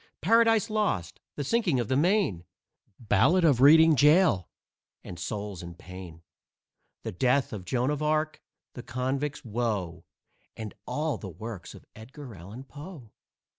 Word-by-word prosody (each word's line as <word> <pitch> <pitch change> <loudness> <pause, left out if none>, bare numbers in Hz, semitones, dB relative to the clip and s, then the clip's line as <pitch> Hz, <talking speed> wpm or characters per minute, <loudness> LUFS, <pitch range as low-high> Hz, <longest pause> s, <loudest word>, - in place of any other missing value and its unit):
"Paradise 225 +1 +3
Lost," 195 - -1 0.2
"The 145 - -3
Sinking 175 - +1
of 120 - -1
the 130 - 0
Maine," 170 - +2 0.5
"Ballad 125 - +3
of 135 -6 +3
Reading 160 +3 +8
Gaol," 150 - +4 0.5
and 90 - -9
"Souls 100 0 -5
in 85 -1 -9
Pain." 90 -2 -11 0.8
"The - - -4
Death 130 +7 +1
of 95 -4 -6
Joan 125 +7 0
of 150 0 -3
Arc," 155 0 0 0.3
"The 125 - -7
Convict's 130 +5 -3
Woe," 105 -7 -2 0.5
And 110 -2 -6
all 155 -1 -2
the 100 - -7
works 100 +1 -8
of - - -15
Edgar 130 +3 -11
Allen 100 +8 -10
Poe. 145 - -11
125 Hz, 140 wpm, -28 LUFS, 100-155 Hz, 0.8 s, Reading